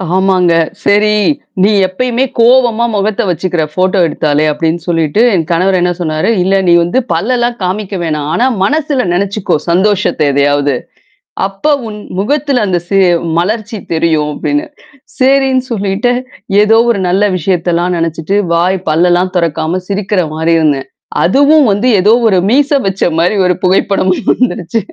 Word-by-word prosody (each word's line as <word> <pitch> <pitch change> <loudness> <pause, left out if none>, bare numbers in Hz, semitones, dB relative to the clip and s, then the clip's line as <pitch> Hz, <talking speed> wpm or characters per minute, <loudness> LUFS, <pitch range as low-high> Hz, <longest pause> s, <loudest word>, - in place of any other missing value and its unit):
ஆமாங்க. 185 -2 +2 0.3
செரி, 210 +1 +2 0.5
"நீ 210 - +4 0.2
எப்பயுமே 250 +6 -1
கோவமா 235 -1 +3
முகத்த 205 0 -1
வச்சுக்கிற, 175 0 -1
ஃபோட்டோ 185 +3 0
எடுத்தாலே!" 150 0 0
அப்படின்னு 165 +2 -2
சொல்லிட்டு, 165 +4 0
என் 165 -2 -1
கணவர் 185 +3 +1
என்னா 175 0 0
சொன்னாரு? 155 +3 -1
"இல்ல, 195 +1 +1
நீ 170 - +5
வந்து 175 +10 0
பல்லெல்லாம் 240 +6 -1
காமிக்க 195 +1 -3
வேணாம். 150 -2 -3
ஆனா, 245 - +1 0.2
மனசுல 285 - 0
நெனச்சுக்கோ 200 +1 -1
சந்தோஷத்த 195 0 +1
எதையாவது! 145 0 +1 0.7
அப்ப 195 +10 -2 0.2
உன் 210 - -8 0.2
முகத்துல 280 +2 0
அந்த 180 -2 0
சே 195 -1 +2 0.4
மலர்ச்சி 215 +3 -2
தெரியும்" 160 -2 0
அப்டின்னு. 295 - -2 0.5
சரின்னு 265 -1 +2
சொல்லிட்டு, 205 +3 -1 0.5
எதோ 225 +2 +4
ஒரு 200 -4 -2
நல்ல 195 +3 +1
விஷயத்தெல்லாம் 175 0 -1
நெனச்சுட்டு, 165 +4 -2 0.2
வாய் 180 +3 +1
பல்லெல்லாம் 175 +3 +1
தொறக்காம 165 +1 -1
சிரிக்கிற 200 -1 -1
மாரி 160 +1 0
இருந்தேன். 145 -4 0 0.4
அதுவும் 285 - +4
வந்து 205 +6 0
ஏதோ 210 +4 +4 0.2
ஒரு 190 - +2
மீச 285 +2 +2 0.2
வச்ச 195 0 -2 0.2
மாரி, 180 +5 +1
ஒரு 180 - +2
புகைப்படம் 190 0 +1 0.2
வந்துருச்சு. 225 -4 -1
190 Hz, 135 wpm, -12 LUFS, 170-225 Hz, 0.7 s, நீ